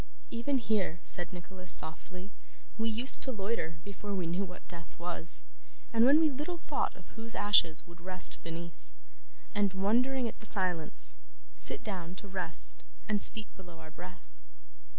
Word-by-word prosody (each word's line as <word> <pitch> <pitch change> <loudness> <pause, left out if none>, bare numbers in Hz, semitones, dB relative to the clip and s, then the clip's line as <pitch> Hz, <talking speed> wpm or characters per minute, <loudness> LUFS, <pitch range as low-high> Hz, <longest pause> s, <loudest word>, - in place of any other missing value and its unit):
'Even 240 +4 0
here,' 210 -8 0
said 175 -1 +4
Nicholas 185 +1 -5
softly, 180 +4 0 0.5
'we 225 0 +1
used 235 +4 +4
to 265 - 0
loiter 200 -6 -2
before 200 0 -5
we 185 -3 -1
knew 175 +4 0
what 180 -1 -9
death 170 -2 -11
was, 170 -1 -1 0.5
and 230 +1 +6
when 285 +4 +7
we 320 - +5
little 300 +6 -3
thought - - -2 0.2
whose 230 +1 -3
ashes 175 -6 +3
would 170 0 -15
rest 185 0 +3
beneath; 170 0 -8 0.6
and, 200 -3 +1
wondering 245 +6 +2
at - - -8
the 220 - -8
silence, 180 -6 -1 0.4
sit 420 - +4
down 180 -4 -5
to 200 - -10
rest 185 -4 -1 0.2
and 210 -2 +1
speak 220 -1 +2
below 175 -3 -12
our 160 -1 -12
breath. 180 +1 -11
190 Hz, 155 wpm, -32 LUFS, 175-225 Hz, 0.6 s, when